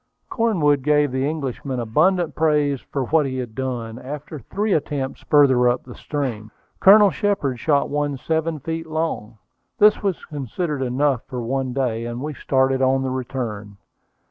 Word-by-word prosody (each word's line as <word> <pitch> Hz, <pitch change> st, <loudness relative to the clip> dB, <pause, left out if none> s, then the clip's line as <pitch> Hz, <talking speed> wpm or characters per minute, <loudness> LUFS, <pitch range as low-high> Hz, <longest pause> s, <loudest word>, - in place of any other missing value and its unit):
Cornwood 170 Hz, -, +2 dB
gave 150 Hz, 0 st, +2 dB
the 130 Hz, +2 st, 0 dB
Englishman 135 Hz, -3 st, -4 dB
abundant 160 Hz, +9 st, +2 dB
praise 150 Hz, -4 st, +1 dB
for 140 Hz, -, -3 dB
what 150 Hz, +1 st, +2 dB
he 130 Hz, -1 st, -4 dB
had 120 Hz, -3 st, -5 dB
done. 120 Hz, -3 st, -4 dB
After 150 Hz, +3 st, -7 dB
three 205 Hz, -, -2 dB
attempts 140 Hz, -3 st, -2 dB
farther 130 Hz, -5 st, +4 dB
up 120 Hz, -, -1 dB
the 125 Hz, -, -11 dB
stream, 120 Hz, -9 st, -4 dB, 0.3 s
Colonel 205 Hz, 0 st, +7 dB
Shepard 195 Hz, -, -1 dB
shot 145 Hz, +1 st, +2 dB
one 145 Hz, -1 st, -1 dB
seven 160 Hz, +3 st, -1 dB
feet 165 Hz, +3 st, -4 dB
long. 155 Hz, -9 st, -3 dB, 0.4 s
This 210 Hz, 0 st, +5 dB
was 195 Hz, -4 st, -2 dB
considered 145 Hz, +2 st, -4 dB
enough 130 Hz, 0 st, +1 dB
for 125 Hz, -2 st, -5 dB
one 130 Hz, +2 st, -2 dB
day, 120 Hz, -3 st, -1 dB
and 120 Hz, 0 st, -5 dB
we 150 Hz, +3 st, -4 dB
started 130 Hz, -1 st, +1 dB
on 135 Hz, 0 st, +2 dB
the 130 Hz, -, -2 dB
return. 120 Hz, -6 st, -5 dB
140 Hz, 160 wpm, -22 LUFS, 125-155 Hz, 0.4 s, Colonel